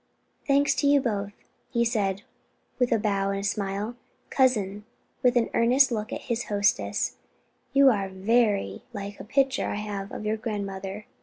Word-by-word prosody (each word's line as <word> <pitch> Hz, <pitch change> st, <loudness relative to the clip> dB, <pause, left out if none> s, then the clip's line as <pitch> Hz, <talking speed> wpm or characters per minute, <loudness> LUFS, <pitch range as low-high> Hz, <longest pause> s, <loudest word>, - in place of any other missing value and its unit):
"Thanks 280 Hz, 0 st, +4 dB
to 285 Hz, -, +2 dB
you 285 Hz, 0 st, +6 dB
both," 205 Hz, -6 st, -2 dB, 0.4 s
he 235 Hz, -2 st, +1 dB
said 200 Hz, -4 st, 0 dB, 0.6 s
with 250 Hz, -1 st, +2 dB
a 230 Hz, -, +4 dB
bow 200 Hz, -2 st, 0 dB
and 195 Hz, 0 st, -2 dB
smile. 205 Hz, +2 st, -2 dB, 0.4 s
"Cousin," 210 Hz, -6 st, +2 dB, 0.4 s
with 250 Hz, 0 st, +3 dB
an 240 Hz, -2 st, +2 dB
earnest 255 Hz, +3 st, +4 dB
look 215 Hz, -2 st, -3 dB
at -, -, -4 dB
his 235 Hz, 0 st, -2 dB
hostess, 205 Hz, +2 st, 0 dB, 0.5 s
"you 275 Hz, -1 st, +6 dB
are 200 Hz, -4 st, -1 dB
very 200 Hz, -, +1 dB
like 200 Hz, 0 st, -6 dB
a -, -, -7 dB
picture 270 Hz, +4 st, +1 dB
I -, -, -2 dB
have 205 Hz, -1 st, -5 dB
of 215 Hz, -, -6 dB
your 215 Hz, +1 st, 0 dB
grandmother. 200 Hz, -2 st, -5 dB
210 Hz, 160 wpm, -26 LUFS, 200-245 Hz, 0.6 s, you